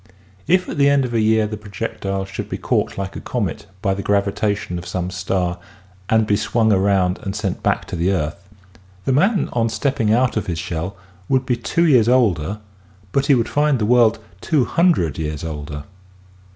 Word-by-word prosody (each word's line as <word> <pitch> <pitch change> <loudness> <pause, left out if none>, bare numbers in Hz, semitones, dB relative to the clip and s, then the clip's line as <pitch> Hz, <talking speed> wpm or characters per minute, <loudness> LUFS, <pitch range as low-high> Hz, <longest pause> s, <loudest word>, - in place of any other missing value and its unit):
If 180 +1 +3
at 150 - -5
the 140 0 +5
end 140 -2 +3
of 120 - -5
a 115 - +2
year 110 0 +3
the 105 0 -4
projectile 95 -1 -4
should 95 0 -6
be - - -3
caught - - -1
like 95 0 -4
a - - -6
comet 105 -5 -3 0.2
by 95 -2 +2
the 100 - -4
gravitation 100 -2 0
of 90 - -9
some 90 0 -3
star 90 -1 -1 0.5
and 110 0 +3
be 105 - +2
swung 110 +1 +2
around 95 -1 +2
and 95 0 -4
sent 100 -3 -3
back - - 0
to - - -6
the 85 +3 +1
earth, 95 +2 -3 0.6
the 135 - +2
man 190 - +2
on 115 -1 +1
stepping 115 -1 0
out 120 +1 +2
of 110 - -2
his 85 -3 -2
shell 85 +3 -4 0.3
would 130 -1 +2
be 125 - +1
two 165 +8 0
years 125 -8 +5
older 105 -6 +2 0.5
but 140 0 +1
he 140 - +6
would 115 -2 +1
find 145 -1 +2
the 110 - 0
world 120 -1 +4 0.2
two 145 -6 +2
hundred 160 - +2
years 75 -2 -3
older. 75 -2 -5
105 Hz, 195 wpm, -20 LUFS, 90-125 Hz, 0.6 s, he